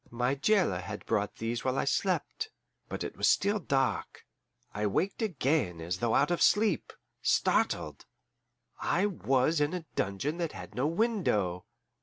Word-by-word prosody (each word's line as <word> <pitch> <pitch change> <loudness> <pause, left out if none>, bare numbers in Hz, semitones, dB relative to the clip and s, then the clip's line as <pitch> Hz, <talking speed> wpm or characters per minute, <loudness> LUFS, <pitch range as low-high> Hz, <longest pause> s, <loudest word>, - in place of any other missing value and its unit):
My 120 +2 0
jailer 150 - +2
had 95 +2 -7
brought 100 0 0
these 115 +1 -3
while 130 0 0
I - - +1
slept. 190 - -1 0.4
But - - -4
it - - -5
was - - +3
still 205 +2 +2
dark. 135 -6 -1 0.5
I 105 0 0
waked 185 - -1
again 140 - 0
as 85 +2 -3
though 115 -1 +1
out 145 +5 +3
of 175 - 0
sleep, 210 +2 +3 0.3
startled: - - +1 0.7
I 180 +4 +1
was 150 -5 +1
in 145 +5 +1
a 175 -3 -5
dungeon 100 - -1
that 170 -3 -2
had 90 +1 -9
no 125 +6 0
window! 160 - 0
135 Hz, 155 wpm, -30 LUFS, -, 0.7 s, was